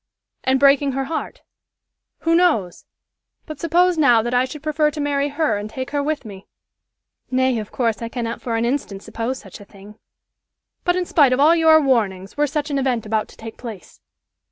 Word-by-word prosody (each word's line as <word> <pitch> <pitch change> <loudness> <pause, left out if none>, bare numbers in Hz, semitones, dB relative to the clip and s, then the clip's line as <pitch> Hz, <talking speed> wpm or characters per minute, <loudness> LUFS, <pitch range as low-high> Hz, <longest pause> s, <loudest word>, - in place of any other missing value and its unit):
"And 265 0 +2
breaking 280 0 +4
her 270 +1 -1
heart 315 +4 -5 0.8
who 330 - +1
knows? 310 - +1 0.6
But 310 -2 -8
suppose 345 +1 +2
now 240 -7 +5
that 240 +1 -3
I 250 +1 +3
should 300 +3 -9
prefer 305 0 +1
to 300 - -8
marry 285 0 0
her 295 -5 0
and 210 +1 -6
take 260 +3 -6
her 290 0 0
with 295 -2 -2
me?" 200 -2 -11 0.8
"Nay, 260 -2 +1
of 210 - -7
course, 230 -3 -1
I 230 - -4
cannot 230 -1 -4
for 235 -2 -3
an 225 +1 0
instant 235 -6 -3
suppose 235 +3 -4
such - - -12
a - - -11
thing." 205 +1 -16 0.9
"But 355 - +2
in 365 0 -1
spite 285 -7 +4
of 255 - 0
all 310 +4 +6
your 320 -1 +6
warnings, 210 -9 0
were 295 0 +1
such 295 +1 -3
an 280 - 0
event 250 -4 -1
about 215 0 -1
to - - -18
take 225 0 -9
place?" 215 - -10
265 Hz, 200 wpm, -21 LUFS, 225-300 Hz, 0.9 s, all